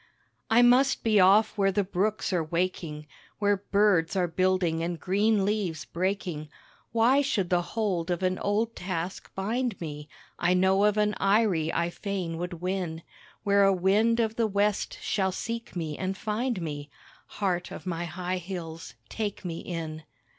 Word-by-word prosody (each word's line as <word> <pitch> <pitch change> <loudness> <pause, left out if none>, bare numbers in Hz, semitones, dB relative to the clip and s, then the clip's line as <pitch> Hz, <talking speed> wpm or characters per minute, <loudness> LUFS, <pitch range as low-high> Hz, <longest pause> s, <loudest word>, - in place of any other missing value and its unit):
I 235 +2 +6
must 255 +3 +4
be 215 -2 +4
off 200 +4 +5
where 195 0 +4
the 200 +2 +1
brooks 200 +2 -1
are 175 -3 +1
waking, 165 -2 -2 0.3
Where 205 -1 +2
birds 200 -4 +2
are 180 -2 +2
building 180 -1 +1
and 170 0 -3
green 200 +3 +2
leaves 195 -7 -1
breaking. 180 -4 -3 0.4
Why 235 +5 +4
should 205 -10 -1
the 175 -1 +3
hold 185 -4 -2
of 175 +1 -1
an 185 0 +1
old 220 +3 0
task 180 0 -4
bind 225 +2 -1
me? 150 -2 -7 0.3
I 180 +1 +3
know 190 +2 +4
of 210 0 +2
an 210 0 +2
eyrie 195 -6 +2
I 170 0 0
fain 180 -4 -4
would 175 0 -4
win 180 -3 -2 0.4
Where 200 -1 +4
a 195 - +5
wind 205 +5 +3
of 225 -1 0
the 230 -2 +2
West 205 0 0
shall 190 -2 0
seek 230 +4 -5
me 160 -4 -4
and 190 0 -2
find 220 +1 -1
me, 145 -2 -5 0.5
(Heart 180 -3 -1
of - - -9
my 175 -1 -2
high 180 +2 -3
hills, 165 -7 -7
take 205 - -4
me 170 -2 -4
in.) 160 -3 -5
190 Hz, 165 wpm, -27 LUFS, 170-210 Hz, 0.5 s, I